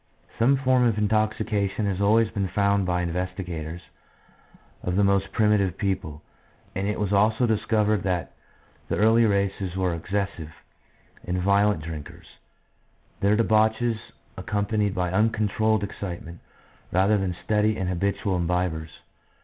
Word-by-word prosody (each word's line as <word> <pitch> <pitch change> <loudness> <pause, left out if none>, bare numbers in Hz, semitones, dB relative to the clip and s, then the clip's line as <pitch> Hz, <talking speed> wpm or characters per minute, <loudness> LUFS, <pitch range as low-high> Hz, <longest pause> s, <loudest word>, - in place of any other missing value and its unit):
Some 130 +4 +4
form 130 -1 +2
of 115 -3 +2
intoxication 105 -1 0
has 100 -1 -1
always 110 +2 +3
been 100 -2 -1
found 100 0 +1
by 90 0 0
the 85 - -2
investigators 90 -2 -5 1.0
of 90 - -2
the 100 - +3
most 100 0 +2
primitive 105 -5 +2
people, 80 -7 -3 0.5
and 95 +1 -2
it 105 - -2
was 105 -1 -1
also 110 +4 +3
discovered 110 -2 +1
that 90 -2 -2 0.6
the - - 0
early 115 +2 +4
races 100 -3 0
were 95 -2 0
ex 85 +2 -8
cessive 95 -6 -3 0.7
and 90 +1 -2
violent 100 -2 +2
drinkers, 80 -3 -8 0.9
their 100 +2 +3
debauches 110 +1 +2 0.4
ac - - -9
companied 105 0 0
by 90 -2 -1
uncontrolled 110 0 +1
excitement, 85 -4 -6 0.5
rather 100 +3 +3
than 90 -3 -2
steady 110 0 +1
and 95 - -2
habitual 95 +2 -1
imbibers. 85 -2 -1
100 Hz, 135 wpm, -25 LUFS, 90-110 Hz, 1.0 s, Some